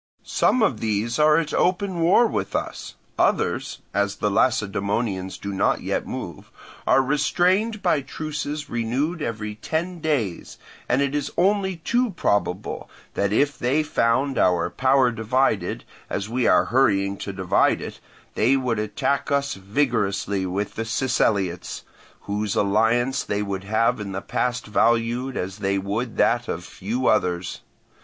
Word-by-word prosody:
Some 250 - +2
of 120 - +1
these 110 +3 -1
are 150 0 +5
at 165 -2 -1
open 185 0 +1
war 175 +8 +5
with - - -2
us; - - -4 0.2
others - - 0
(as 100 0 0
the 105 - -1
Lacedaemonians 100 -3 0
do 100 0 -5
not 95 - +1
yet - - -2
move) - - -7 0.4
are 135 - +5
restrained 180 - +1
by 165 -5 +2
truces 150 +1 -5
renewed 130 +9 -1
every 105 -4 -3
ten 165 +10 -3
days, 135 - -2 0.3
and 130 +3 +3
it 140 0 -1
is 145 -1 -2
only 190 +1 +2
too 240 +9 0
probable 100 - -1 0.2
that 100 0 0
if 145 +6 +1
they 135 +6 +1
found 135 -1 +1
our 90 -1 +2
power 130 +1 +3
divided, 115 +4 0 0.3
as 100 - -3
we 120 +2 0
are - - +5
hurrying 100 -7 +3
to 100 - -5
divide 95 -2 +2
it, - - -7 0.3
they 130 +5 +3
would 125 -4 -1
attack 110 +8 -1
us 140 0 +1
vigorously 100 -3 -1
with 100 +3 -3
the 115 - -3
Siceliots, 100 -7 0 0.4
whose 105 0 -2
alliance 115 +6 +2
they 100 0 -2
would 95 -1 -4
have 115 +3 +1
in 100 -2 -5
the 95 - -3
past 125 +4 -2
valued 115 +4 +1
as 95 +3 -4
they 100 -1 0
would 105 +5 -3
that 120 +1 +2
of 85 - -4
few 115 +10 -4
others. 90 -5 +1
115 Hz, 150 wpm, -23 LUFS, 100-145 Hz, 0.4 s, are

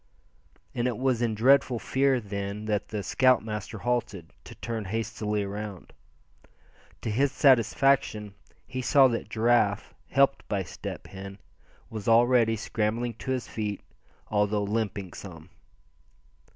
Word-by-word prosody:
And 120 0 0
it 120 -4 -2
was 130 -2 +1
in 115 -2 0
dreadful 130 +2 +4
fear, 130 +4 +1
then, 100 0 -5
that 105 -1 -1
the 105 -2 -4
scoutmaster 110 -1 +1
halted, 105 -8 -2
to - - -11
turn 115 -3 -4
hastily 105 0 -2
around. 100 -3 -7 1.1
To 110 - -2
his 135 +5 +2
satisfaction 130 -5 +3 0.3
he 130 - -4
saw 135 +1 +6
that 115 -3 -3
Giraffe, 110 -2 +1 0.2
helped 140 0 +2
by 100 -2 -1
Step 85 - -7
Hen, 95 0 -9 0.5
was 110 -3 -6
already 115 0 +4
scrambling 115 +2 -2
to - - -7
his 130 -2 -1
feet, 105 -2 -4 0.5
although 105 0 +1
limping 100 -3 -2
some. 85 -3 -10
110 Hz, 125 wpm, -27 LUFS, 105-120 Hz, 1.1 s, saw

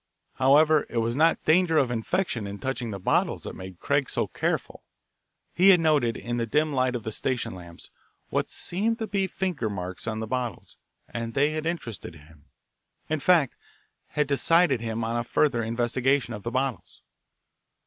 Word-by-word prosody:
However, 150 +3 +5
it - - -5
was 115 +1 0
not 160 +4 +3
danger 165 0 +4
of 130 -5 +3
infection 120 - -1
in 100 +1 -6
touching 130 0 -3
the 100 - -4
bottles 95 - 0
that - - -6
made 95 -1 -9
Craig - - 0
so - - 0
careful. - - -3 0.7
He 185 +3 +5
had 185 -2 +7
noted, 150 -8 +2
in 120 0 -4
the 115 -1 -1
dim 150 +5 +1
light 130 -1 +1
of 120 - -4
the 110 - -4
station 120 -1 -2
lamps, 85 -2 -11 0.4
what - - -1
seemed 220 +6 -1
to 225 - -3
be 195 -2 0
finger 180 - -2
marks 95 0 -6
on 110 -1 -2
the 110 - -3
bottles, 120 -3 -4 0.3
and 115 0 -5
they 145 +2 +3
had 155 +1 -3
interested 115 - -5
him, 75 -1 -18 0.6
in 155 0 0
fact, 160 -3 +3 0.5
had 150 - 0
decided 140 0 +3
him 115 0 -3
on 115 +1 -1
a 120 - 0
further 120 0 +1
investigation 120 +4 0
of 105 - -6
the 115 - -3
bottles. 130 0 -3
125 Hz, 180 wpm, -26 LUFS, 115-155 Hz, 0.7 s, had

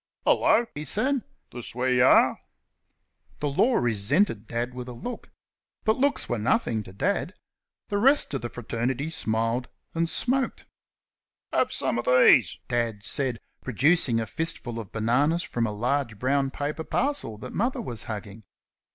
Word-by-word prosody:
"Hello!" 240 - +4
he 150 - -5
said, 250 - +1 0.3
"this 120 -2 -7
where 130 +1 +1
y' 125 - +2
are?" 130 - +5 1.0
The 145 - -1
Law 235 - +3
resented 115 - +1
Dad 120 +1 -3
with 125 0 -7
a - - -6
look. 240 - -7 0.5
But 220 0 +2
looks 280 +2 +1
were 120 - -1
nothing 115 - +1
to 100 - -11
Dad. 95 - -1 0.5
The 205 - 0
rest 270 - +4
of 135 - -2
the 120 - -4
fraternity 120 +6 -3
smiled 115 -2 -1 0.2
and 165 0 0
smoked. 265 +6 0 0.9
"Have - - +2
some - - -1
o' - - +4
these," 455 - +5
Dad 115 -4 -1
said, 130 -1 -1 0.2
producing 135 - +3
a 115 - -1
fistful 120 -3 -2
of 105 -4 -8
bananas 140 +10 +1
from 115 -1 -1
a - - -3
large 120 +1 -1
brown 135 +4 +1
paper 145 +3 -4
parcel 265 - -1
that 125 +3 -8
Mother 240 +5 0
was 120 -4 -4
hugging. 105 0 -7
125 Hz, 155 wpm, -26 LUFS, 115-165 Hz, 1.0 s, are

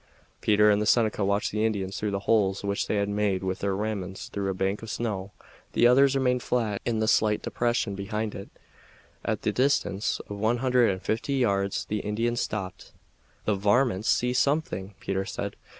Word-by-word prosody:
Peter 105 0 +5
and 105 0 +2
the - - 0
Seneca 110 -3 +3
watched 100 +1 0
the 105 +1 -1
Indians 100 -4 -1
through 105 -2 -1
holes 100 -1 +1
which 100 0 -1
they - - 0
had 100 -1 +1
made 100 -2 0
with 95 0 -2
their 100 -1 -1
ramrods 100 -2 -4
through 100 -1 -2
a - - 0
bank 95 +2 -1
of 115 - -8
snow. 105 -4 -3 0.4
The - - +4
others 135 +3 +5
remained 125 -2 +1
flat 110 -6 -1
in 115 -2 0
the 110 0 0
slight 105 -1 +2
depression 120 -3 0
behind 105 +2 -3
it. 100 - -8 0.7
At - - -2
the - - +1
distance 105 -7 +1
of 100 0 -7
one 110 +3 +2
hundred 125 -1 +3
and 95 -1 -3
fifty 115 +6 -1
yards 100 -6 0
the 105 - -2
Indians 115 +4 -1
stopped. 95 -3 -5 0.5
"The 105 - +2
varmints 105 +1 +2
see 125 0 +2
something!" 125 - 0
Peter 95 0 -2
said. - - -5
105 Hz, 185 wpm, -27 LUFS, 100-115 Hz, 0.7 s, Peter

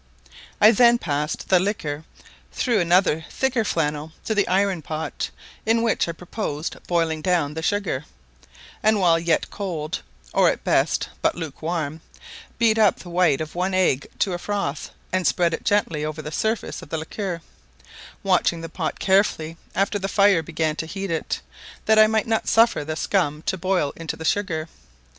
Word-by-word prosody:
I 215 - +8
then 235 +1 +6
passed 150 -6 -3
the 185 - +6
liquor 160 -6 -2 0.5
through 235 -5 +1
another 175 -2 +3
thicker 265 -3 0
flannel 155 -4 -1
into 220 - -1
the 205 -2 +2
iron 190 -2 +1
pot, 155 +1 -4 0.3
in 225 +1 +2
which 225 -6 +1
I - - -1
purposed 170 -3 -4
boiling 165 -2 0
down 165 -4 +1
the 160 - -4
sugar, 170 -6 -1 0.8
and 215 -1 +3
while 170 -3 +4
yet 165 -1 0
cold, 170 -6 -4 0.3
or - - +5
at - - -3
best - - +1
but - - +2
lukewarm, 160 -1 -4 0.6
beat 225 -1 +3
up 210 -3 +4
the 175 - -10
white 170 -5 +3
of 155 -1 -5
one 185 +2 -1
egg 175 -7 +2
to 190 - +1
a 175 - -3
froth, 200 -8 -3 0.2
and 185 -2 +2
spread 170 -2 +2
it - - -4
gently 185 -7 +1
over 155 0 -4
the 150 - -6
surface 220 +7 -2
of - - -12
the 160 - -2
liquor, 170 +1 -4 0.8
watching 180 -3 +2
the 165 - -6
pot 160 -2 -3
carefully 190 -5 +2 0.2
after 195 +2 +1
the 195 - -2
fire 200 -3 +4
began 160 -1 -1
to 160 - -3
heat 195 +1 -4
it, 160 - -2 0.4
that 220 0 +5
I 215 - +8
might 220 +1 +1
not 225 -2 0
suffer 230 -8 +4
the 155 +1 -4
scum 155 -4 0
to - - 0
boil 185 -5 0
into 165 -1 -5
the 160 - -7
sugar. 165 -5 0
175 Hz, 175 wpm, -23 LUFS, 160-205 Hz, 0.8 s, I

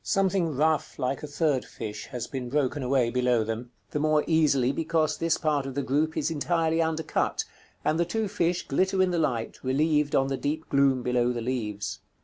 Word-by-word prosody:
Something 190 -6 +1
rough, 155 +2 +1
like 130 +1 -1
a 150 - -5
third 145 -3 +1
fish, 105 -1 -7
has 125 -3 -5
been 125 -2 -5
broken 145 +1 0
away 125 -2 +2
below 125 -2 +2
them; 115 +2 -4 0.2
the 150 - -1
more 155 0 +3
easily 145 -6 +3
because 160 +1 0
this 165 0 +1
part 150 -4 0
of 135 - -6
the 140 - -1
group 155 +4 0
is 155 +2 0
entirely 165 +1 +1
undercut, 160 0 0 0.4
and 155 +2 +2
the - - +4
two 220 +5 -1
fish 180 -3 -1
glitter 190 +6 +2
in 185 - +1
the 175 - 0
light, 125 -8 -1
relieved 150 +2 +2
on 135 - +4
the 135 0 -2
deep 155 +4 -3
gloom 135 -2 +3
below 125 0 +2
the 120 - -3
leaves. 110 -4 -3
145 Hz, 195 wpm, -27 LUFS, 125-160 Hz, 0.4 s, the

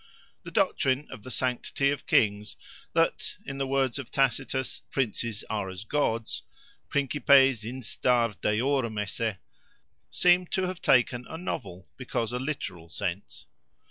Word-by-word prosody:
The - - -8
doctrine 135 +2 +1
of 125 - -8
the 130 - -9
sanctity 130 +3 0
of 145 - -5
kings, 105 -1 +2 0.4
that, - - +1
in 135 0 -5
the 135 - 0
words 135 -1 +1
of 135 - -7
Tacitus, 130 0 0
Princes 115 -3 -1
are 105 -3 -2
as 95 +2 -7
Gods—Principes 135 +1 +1
instar 120 -1 +1
deorum 115 +1 +1
esse—seemed 115 - -1
to 190 - +1
have 185 -1 -3
taken 125 -1 +3
a 160 - -5
novel, 95 - -5
because 120 -3 -2
a 125 - -1
literal, 95 - -4
sense. - - -5
125 Hz, 125 wpm, -28 LUFS, 110-135 Hz, 0.4 s, taken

